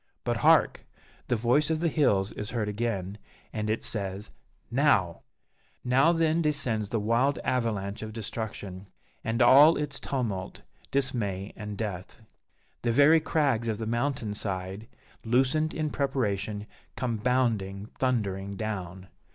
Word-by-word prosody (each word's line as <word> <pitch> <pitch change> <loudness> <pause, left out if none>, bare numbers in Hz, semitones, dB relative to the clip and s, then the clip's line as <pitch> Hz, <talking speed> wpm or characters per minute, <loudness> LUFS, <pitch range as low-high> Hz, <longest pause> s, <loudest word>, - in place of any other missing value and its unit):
But - - 0
hark! - - +3 0.4
the - - +1
voice 120 +7 +2
of 160 -1 +1
the 170 - +1
hills 105 -11 +2
is 105 - -5
heard 115 -4 -2
again, 105 -2 -3 0.3
and 110 -1 -2
it 110 - -1
says 100 -1 -4 0.4
"Now!" - - +2 0.6
Now, 135 +6 +4
then, 165 -1 +2
descends 130 -9 -1
the 115 - 0
wild 120 +6 +2
avalanche 110 -5 -1
of 110 0 -5
destruction, 105 -3 -6 0.4
and 115 +2 +1
all 145 +6 +8
is 145 -2 -3
tumult, 110 -9 -3 0.3
dismay, 110 -8 -2
and 105 -1 -6
death. 100 0 -5 0.6
The 120 - +1
very 145 +6 +6
crags 145 -7 +1
of 110 -2 -1
the 110 - -4
mountain 120 -1 -1
side, 95 +1 -4 0.4
loosened 135 +7 +2
in 155 -1 -2
preparation, 105 -7 -1 0.3
come 120 -4 -2
bounding, 110 -5 0
thundering 100 -6 -1
down. 95 -3 -5
115 Hz, 135 wpm, -28 LUFS, 100-135 Hz, 0.6 s, all